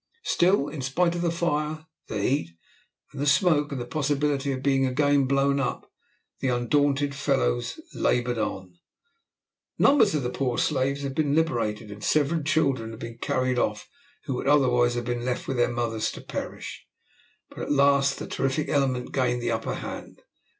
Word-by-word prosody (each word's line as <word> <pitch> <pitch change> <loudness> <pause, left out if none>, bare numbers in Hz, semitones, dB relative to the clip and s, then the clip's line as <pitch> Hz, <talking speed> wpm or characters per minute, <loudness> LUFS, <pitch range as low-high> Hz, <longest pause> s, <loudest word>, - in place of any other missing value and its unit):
Still, 175 -4 +2
in 145 -1 -6
spite 170 +7 +1
of 175 - -3
the 175 - +1
fire, 155 -2 -1 0.2
the 105 - -3
heat, 120 - 0 0.6
and - - -7
the 145 - 0
smoke, 150 0 +3
and 140 - -3
the 120 - -4
possibility 145 +1 0
of 130 0 -4
being 135 -1 +2
again 140 +1 +2
blown 140 +1 +2
up, 135 - -3 0.5
the - - -1
undaunted 140 +3 +1
fellows - - 0
laboured 120 -1 0
on. 95 -4 -4 1.0
Numbers 225 - +5
of 145 - 0
the 125 - -2
poor 125 -2 -1
slaves 140 -1 0
had 135 -1 -3
been 145 0 +1
liberated, 115 -10 0
and 105 +1 -10
several 155 +2 +2
children 140 -6 +1
had 110 0 -9
been 115 0 -8
carried 130 0 0
off 105 -2 -1 0.4
who 135 - -2
would 125 - -3
otherwise 125 -4 +4
have 120 -1 -3
been 120 -1 -2
left 125 0 -2
with 135 - -2
their 120 - +3
mothers 115 -2 -1
to - - -9
perish; - - -7 0.6
but - - -11
at - - -3
last 140 -1 +3
the - - -5
terrific 135 +3 -1
element 135 -4 0
gained 125 -2 +1
the 120 - 0
upper 115 0 -2
hand. - - -8
135 Hz, 175 wpm, -26 LUFS, 120-145 Hz, 1.0 s, Numbers